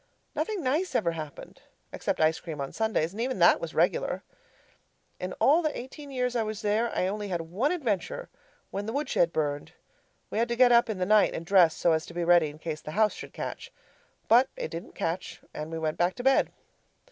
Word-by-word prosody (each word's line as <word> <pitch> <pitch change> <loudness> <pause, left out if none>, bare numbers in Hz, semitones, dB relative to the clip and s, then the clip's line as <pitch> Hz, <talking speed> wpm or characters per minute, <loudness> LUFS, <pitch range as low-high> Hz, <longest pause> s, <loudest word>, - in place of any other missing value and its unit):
Nothing 425 -6 -2
nice 305 +8 0
ever 170 - +2
happened, 155 -3 -8 0.3
except - - -2
ice 160 0 +3
cream 160 -4 -7
on 135 -1 -4
Sundays, 220 -7 0
and 220 - -4
even 255 +2 -1
that - - +5
was - - -5
regular. - - +1 1.0
In 180 0 -4
all 305 +5 +4
the 310 -2 -1
eighteen 280 +4 -9
years 250 -2 -1
I 235 - +2
was 215 0 -4
there 215 +3 +1
I - - +1
only 205 +2 -2
had 175 -3 -2
one 195 - -1
adventure 270 - -2 0.4
when 200 +2 -4
the 225 - -3
woodshed 270 - +1
burned. 145 -2 -2 0.6
We - - -1
had 235 - +2
to 235 - -1
get 250 0 +6
up 235 0 +5
in 215 - -2
the 180 - 0
night 215 +1 +4
and 165 - -5
dress 175 -3 +5
so 170 - +2
as 160 0 0
to - - -11
be 175 - -1
ready 170 -2 +5
in 145 - -11
case 155 -1 -5
the 155 - -7
house 215 -1 +4
should - - -9
catch. - - -6 0.6
But 250 +4 +5
it - - -4
didn't 165 0 -7
catch 170 +3 -3
and 155 +1 -6
we 165 - -3
went 155 -1 -2
back 175 +1 +2
to 245 - -6
bed. 270 +1 +3
205 Hz, 215 wpm, -28 LUFS, 165-250 Hz, 1.0 s, get